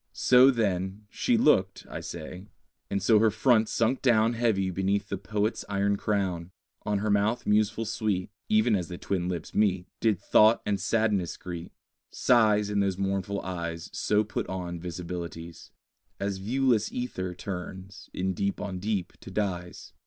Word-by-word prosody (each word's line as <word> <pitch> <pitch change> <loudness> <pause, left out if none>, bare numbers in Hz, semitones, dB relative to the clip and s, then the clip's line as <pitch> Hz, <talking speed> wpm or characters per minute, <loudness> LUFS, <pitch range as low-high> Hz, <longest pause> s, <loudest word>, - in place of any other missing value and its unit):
So, 125 +1 +6
then, 100 -4 -1
she 245 -2 +1
looked 95 - +2
(I - - -6
say); 90 +4 -8 0.4
And 100 - -1
so 110 +2 +5
her 110 +1 +5
front 110 0 +3
sunk 115 +3 +1
down 115 -2 +3
Heavy 110 -5 +1
beneath 100 +2 -1
the 100 - -2
poet's 105 +3 -1
iron 100 0 +1
crown: 95 -5 -1 0.4
On 105 -1 +1
her 105 +1 0
mouth 105 +4 +1
museful 105 +2 +2
sweet 105 -4 -2 0.2
(Even 110 +1 +4
as 90 -4 -2
the 90 - -7
twin 90 -1 -2
lips 85 -3 -5
meet) 95 -4 +2
Did 110 -6 +2
thought 110 +2 +4
and 100 -1 0
sadness 105 -5 0
greet: 85 -1 -7 0.4
Sighs 105 -4 +3
In 100 - +1
those 100 -2 +1
mournful 100 0 -1
eyes 85 -2 -5
So 105 0 +2
put 105 - -4
on 90 -2 -4
visibilities; 85 -1 -7 0.5
As 100 -1 -2
viewless 120 +1 +1
ether 95 -8 -4
turns, 95 0 -7
in 95 +1 -2
deep 100 +2 -2
on 95 -3 -4
deep, 100 -2 -2
to - - -11
dyes. 90 -3 -4
100 Hz, 160 wpm, -28 LUFS, 90-110 Hz, 0.5 s, So